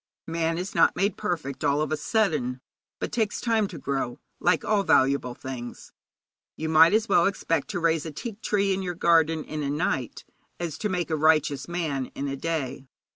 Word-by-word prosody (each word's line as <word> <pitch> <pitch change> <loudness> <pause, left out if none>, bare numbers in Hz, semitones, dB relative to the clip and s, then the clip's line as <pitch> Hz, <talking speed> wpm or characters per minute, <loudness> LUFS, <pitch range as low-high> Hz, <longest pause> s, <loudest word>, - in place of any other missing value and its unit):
Man 165 0 -1
is 185 +3 -4
not - - +4
made 195 +2 +1
perfect 145 -6 -3
all 140 +1 +2
of 155 -1 -1
a - - +2
sudden, 150 - 0 0.4
but - - -3
takes 215 -2 0
time 225 -3 +1
to - - -9
grow, 135 -3 -3 0.2
like 175 -2 +2
all 210 -2 +2
valuable 135 -7 +2
things. 125 -2 -8 0.6
You 160 0 -3
might 160 +1 +7
as 220 +1 +1
well 170 - +4
expect 165 -6 -1
to 200 -4 -3
raise 165 -1 +1
a - - -5
teak 215 - -7
tree 200 -2 +1
in 190 - -2
your 180 -2 -3
garden 165 -2 +3
in 155 +1 -5
a 140 - -2
night 140 -5 -2 0.3
as 165 -3 -4
to 210 - -1
make 180 -3 -2
a - - +2
righteous 155 -3 +2
man 155 -7 -2
in 140 - -3
a 135 - -2
day. 140 -3 -3
160 Hz, 195 wpm, -26 LUFS, 140-180 Hz, 0.6 s, might